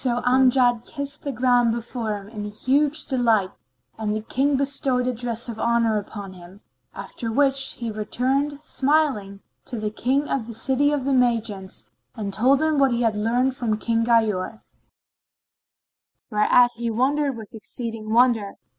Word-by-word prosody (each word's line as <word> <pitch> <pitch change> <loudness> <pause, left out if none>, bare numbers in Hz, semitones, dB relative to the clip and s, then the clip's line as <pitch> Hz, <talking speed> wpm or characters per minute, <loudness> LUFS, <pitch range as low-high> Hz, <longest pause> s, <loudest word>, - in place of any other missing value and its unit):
So 245 -2 +1
Amjad 250 -2 +3
kissed 280 +1 -5
the 280 - -3
ground 245 -1 +2
before 230 -2 -3
him 200 0 -11
in 210 -2 -6
huge 280 +8 +1
delight 225 -7 +1 0.5
and 215 -1 -1
the 215 - -3
King 270 +5 0
bestowed 270 -2 0
a 255 - 0
dress 235 0 -2
of 230 -2 -6
honour 230 -2 +2
upon 200 -1 -8
him, 180 +2 -14 0.4
after 230 -3 -5
which 270 +1 +3
he 235 -2 -5
returned, 265 +7 -1
smiling, 265 -11 0 0.2
to 240 - -6
the 215 -1 -3
King 265 +6 0
of 245 -5 -2
the 230 - -7
City 270 +5 +1
of 285 -3 -1
the 275 - +1
Magians 230 -6 0 0.3
and 205 -4 -5
told 265 +8 +3
him 310 -2 +1
what 270 -2 +4
he 240 0 0
had 225 -2 +1
learnt 240 +5 +1
from 230 -4 -2
King 230 +1 0
Ghayur, 220 -3 +1 1.7
whereat 240 +3 +4
he 235 0 -2
wondered 270 +3 0
with 220 -2 -11
exceeding 225 0 -6
wonder. 230 -4 +3
240 Hz, 160 wpm, -23 LUFS, 215-265 Hz, 1.7 s, what